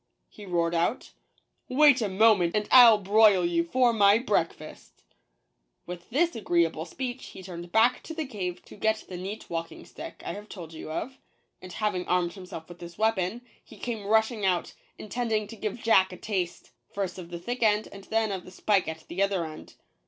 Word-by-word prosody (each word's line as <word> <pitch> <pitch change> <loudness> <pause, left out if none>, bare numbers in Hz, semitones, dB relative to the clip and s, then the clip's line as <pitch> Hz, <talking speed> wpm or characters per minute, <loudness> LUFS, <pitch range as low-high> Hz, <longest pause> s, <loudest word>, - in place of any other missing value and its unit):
he 205 -2 -12
roared 170 -1 0
out; 170 +8 -1 0.6
"wait 280 0 +5
a 210 - 0
mo 220 +4 +6
ment, 175 -3 -1
and 210 0 0
I'll 240 -4 +9
broil 205 -2 +4
you 170 -1 +1
for 245 +7 +2
my 205 -1 +5
breakfast! 200 - -3 0.4
" - - -50
With 175 0 -9
this 335 +8 +1
agreeable 170 -6 0
speech 255 +6 -6
he 190 - -11
turned 175 -1 -8
back 225 +4 +4
into 320 - -9
the 315 -1 -3
cave 185 -8 -5
to - - -13
get 220 +1 0
the 185 - -8
neat 195 +4 -6
walking 165 0 -5
stick - - -10
I - - -3
have 210 +1 -10
told 165 -4 -9
you 160 - -8
of; 260 +11 -5 0.4
and 185 - -10
having 195 -3 -2
armed 175 -1 +1
himself 180 -4 -9
with 175 0 -12
this 170 0 -10
weapon, 220 +1 0 0.2
he - - -15
came 225 -4 -5
rushing 220 0 +2
out, 180 -2 0 0.2
in - - -9
tending 225 -2 -1
to 225 - -8
give 220 +1 -5
Jack 190 -4 +4
a 180 - -9
taste 185 -5 -4
— - - -45
first 190 -2 -3
of 170 -2 -9
the 175 - -6
thick 240 +9 -5
end, 215 -1 +3
and 195 -1 -11
then 220 -1 0
of 190 -2 -4
the - - -12
spike 195 +1 +1
at 160 0 -7
the 180 +3 -4
other 195 -4 +1
end. 155 -1 -10
200 Hz, 205 wpm, -27 LUFS, 175-220 Hz, 0.6 s, I'll